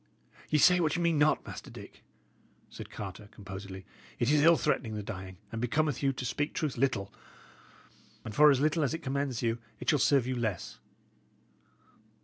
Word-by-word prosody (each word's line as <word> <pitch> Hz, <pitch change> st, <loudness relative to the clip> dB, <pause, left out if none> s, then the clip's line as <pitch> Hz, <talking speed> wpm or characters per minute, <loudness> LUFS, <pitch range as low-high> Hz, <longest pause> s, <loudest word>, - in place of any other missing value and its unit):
"Ye 155 Hz, -, +3 dB
say 180 Hz, +4 st, +6 dB
what 160 Hz, -2 st, +1 dB
ye 175 Hz, -, -1 dB
mean 165 Hz, -3 st, +2 dB
not, 150 Hz, +1 st, +3 dB
Master -, -, -8 dB
Dick," -, -, -12 dB, 0.7 s
said -, -, -9 dB
Carter, 100 Hz, 0 st, -8 dB
composedly. 95 Hz, -1 st, -9 dB, 0.3 s
"It 120 Hz, +4 st, +1 dB
is 150 Hz, -1 st, +4 dB
ill 165 Hz, +2 st, +6 dB
threatening 120 Hz, -7 st, -1 dB
the 105 Hz, -, -4 dB
dying, 95 Hz, -3 st, -7 dB
and 115 Hz, -, -4 dB
becometh 150 Hz, +5 st, 0 dB
you 135 Hz, -1 st, +2 dB
(to 130 Hz, -1 st, -6 dB
speak 145 Hz, +4 st, -2 dB
truth) 150 Hz, -4 st, -1 dB
little. 115 Hz, -6 st, -1 dB, 1.1 s
And 110 Hz, -, -6 dB
for 150 Hz, +6 st, +7 dB
as 135 Hz, -3 st, +4 dB
little 155 Hz, +3 st, +2 dB
as 145 Hz, +1 st, 0 dB
it 165 Hz, -, -8 dB
commends 135 Hz, -2 st, -2 dB
you, 115 Hz, 0 st, 0 dB, 0.2 s
it -, -, +1 dB
shall 150 Hz, -, +2 dB
serve 135 Hz, -2 st, +3 dB
you 130 Hz, 0 st, -2 dB
less. 110 Hz, -7 st, -3 dB
130 Hz, 180 wpm, -30 LUFS, 110-150 Hz, 1.1 s, for